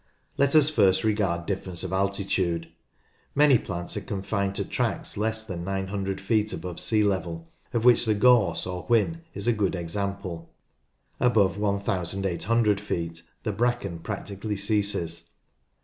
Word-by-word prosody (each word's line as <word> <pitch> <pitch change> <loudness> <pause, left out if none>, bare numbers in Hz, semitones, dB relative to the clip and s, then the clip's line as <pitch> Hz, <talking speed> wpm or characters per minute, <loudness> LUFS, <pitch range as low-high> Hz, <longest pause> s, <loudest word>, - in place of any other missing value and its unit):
Let 140 +2 +2
us 150 -2 +7
first 95 -10 +3
regard 100 -6 0
difference 95 -2 -3
of 95 0 -4
altitude. 95 -3 0 0.7
Many 145 -4 +6
plants 85 -4 -4
are 105 - -2
confined 100 0 -2
to - - -1
tracts - - -2
less 110 +1 -1
than 95 -6 -5
900 95 +1 -2
feet 105 +1 +1
above 85 +1 -6
sea 105 +4 +2
level, 85 -4 -2 0.2
of 120 -1 -1
which 120 -1 +6
the 110 -1 +2
gorse 105 -5 +4
or 90 -1 -4
whin 120 - +2
is 100 - -4
a 120 - +4
good 100 -4 0
example. 90 -1 -4 0.7
Above 105 -7 +3
1800 100 +2 0
feet 85 -5 -3 0.2
the 110 - -1
bracken 110 -5 -1
practically 100 +2 -4
ceases. 100 -5 -1
100 Hz, 140 wpm, -26 LUFS, 90-110 Hz, 0.7 s, us